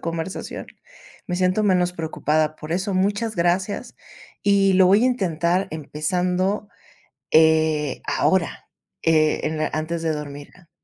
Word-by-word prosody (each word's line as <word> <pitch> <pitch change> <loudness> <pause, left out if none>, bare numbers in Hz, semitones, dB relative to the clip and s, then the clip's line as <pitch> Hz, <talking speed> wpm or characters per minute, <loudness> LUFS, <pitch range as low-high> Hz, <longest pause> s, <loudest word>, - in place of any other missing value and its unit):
conversación, 165 +2 -5 0.6
me 180 - -2
siento 185 +3 +1
menos 180 -3 +2
preocupada 155 -2 -1
por 155 +2 -6
eso, 190 +2 -1
muchas 205 +3 0
gracias 180 +4 -1 0.5
y 200 -1 +3
lo 185 -1 +6
voy 200 +4 +5
a - - +5
intentar 185 -5 0
empezando, 180 +7 -1 0.6
eh, 155 -3 +3
ahora, 190 -3 0 0.3
eh, 155 -2 +3
en 155 +1 -2
la 155 - 0
antes 160 +2 -2
de 160 -1 0
dormir 145 -1 -7
la 175 -3 -21
175 Hz, 135 wpm, -22 LUFS, 155-190 Hz, 0.6 s, lo